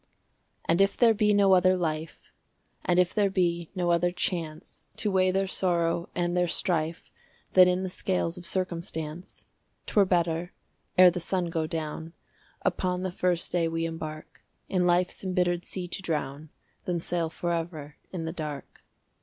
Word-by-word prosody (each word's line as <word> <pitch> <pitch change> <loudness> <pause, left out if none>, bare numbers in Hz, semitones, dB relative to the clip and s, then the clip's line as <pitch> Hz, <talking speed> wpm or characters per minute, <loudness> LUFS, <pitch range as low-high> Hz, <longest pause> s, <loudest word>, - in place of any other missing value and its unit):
And 170 +3 +3
if 195 0 +2
there 235 -2 +6
be 210 -1 +2
no 200 -2 +5
other 185 0 +5
life, 160 -2 -4 0.5
And 180 - +2
if 180 -1 +3
there 205 -2 +2
be 170 -3 0
no 175 -2 +1
other 175 +1 +2
chance 170 -2 -4
To 210 - 0
weigh 185 -1 +3
their 195 +1 +1
sorrow 170 -2 0
and 175 0 0
their 180 0 +2
strife 165 -2 -1 0.4
Than 185 -1 +8
in 180 +1 +1
the 190 - -2
scales 180 -3 -1
of 180 -1 -7
circumstance, 170 -2 -4 0.4
'T - - -8
were 205 -2 +5
better, 175 -1 0 0.4
ere 180 -1 +9
the 180 - -4
sun 175 0 -1
go 160 -1 -1
down 160 +1 -5 0.5
Upon 180 0 0
the 185 - -2
first 180 -1 0
day 170 -2 +1
we 165 0 -1
embark, 155 -1 -7 0.3
In 180 -2 +1
life's 180 +2 +2
imbittered 180 -2 0
sea 180 -2 -4
to 190 - -4
drown, 150 -3 -3 0.4
Than 175 -1 -1
sail 170 0 -1
forever 165 -3 -4
in 170 -3 -4
the 160 - -4
dark. 150 -5 -7
175 Hz, 165 wpm, -27 LUFS, 165-185 Hz, 0.5 s, ere